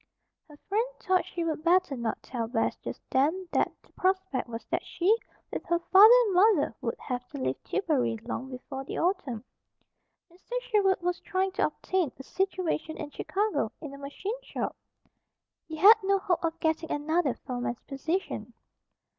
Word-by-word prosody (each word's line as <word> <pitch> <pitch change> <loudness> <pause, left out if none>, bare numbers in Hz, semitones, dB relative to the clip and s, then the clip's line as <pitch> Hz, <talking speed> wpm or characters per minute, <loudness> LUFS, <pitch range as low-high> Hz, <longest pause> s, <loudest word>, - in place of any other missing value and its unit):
Her 295 - -14
friend 440 +5 +1
thought 370 0 +1
she 345 - -3
would 315 -2 -2
better 350 -4 +3
not 235 -3 -3
tell 235 -3 -3
Bess 225 -1 0
just - - -7
then 320 +8 +2
that - - +2
the - - -27
prospect 375 -9 0
was 230 0 -6
that - - 0
she, 375 +6 +2 0.4
with - - -3
her 340 - +2
father 390 +6 +8
and 405 - 0
mother, 365 - +4
would 235 -3 -2
have 250 -1 -4
to 285 - -8
leave 260 - -2
Tillbury 290 - 0
long 245 +2 -4
before 265 +1 -6
the - - -6
autumn. 325 - -1 0.9
Mr. 485 +8 -4
Sherwood 410 -6 +2
was 355 0 -1
trying 380 +1 -1
to - - +2
obtain 365 -7 -1
a 270 - -9
situation 360 -2 -2
in 290 - -6
Chicago, 415 +8 -1
in 295 -4 -8
a 280 - -10
machine 390 - -5
shop. - - -4 0.9
He 315 - -6
had 410 +8 +8
no 395 0 +3
hope 355 -3 0
of 330 0 -1
getting 320 0 0
another 300 -1 +1
foreman's 245 -1 -4
position. 275 - -3
335 Hz, 170 wpm, -28 LUFS, 270-380 Hz, 0.9 s, father